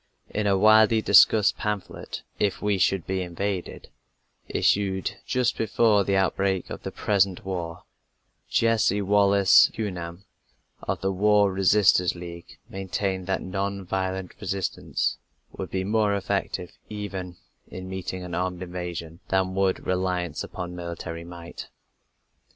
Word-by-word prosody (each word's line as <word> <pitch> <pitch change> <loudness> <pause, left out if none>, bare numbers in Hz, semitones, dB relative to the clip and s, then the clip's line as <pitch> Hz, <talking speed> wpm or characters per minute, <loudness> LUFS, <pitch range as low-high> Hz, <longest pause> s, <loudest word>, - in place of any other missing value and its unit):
In 105 -1 -1
a 100 -1 +3
widely 110 +2 +6
discussed 105 +1 +6
pamphlet, 105 -2 -4 0.2
If 100 - +1
We 105 -2 0
Should 95 0 +2
Be 95 0 -1
Invaded, 90 +1 -4 0.6
issued 95 -2 0
just 125 -1 +1
before 110 -2 +3
the 100 +1 0
outbreak 95 0 0
of - - -6
the - - -5
present 100 -3 0
war, 85 -3 -4 0.7
Jessie 110 -3 +2
Wallace 100 -1 +5
Hughan, 90 -4 -5 0.6
of - - -3
the 95 +1 0
War 100 0 +3
Resisters 95 -2 +4
League, 85 -1 -10
maintained 95 0 -3
that 95 - -1
non 100 +1 -3
violent 95 0 -3
resistance 95 -2 -2 0.4
would - - -5
be 95 0 -2
more 105 0 +2
effective 100 -2 -2 0.2
even 95 -4 -6 0.3
in 95 0 -8
meeting 95 0 -5
an 90 -1 -7
armed 90 +1 -2
invasion 85 -2 -6
than 95 -1 +1
would 95 0 0
reliance 90 -3 -1
upon 90 -1 -6
military 85 -1 -6
might. 85 0 -9
95 Hz, 130 wpm, -25 LUFS, 90-100 Hz, 0.7 s, widely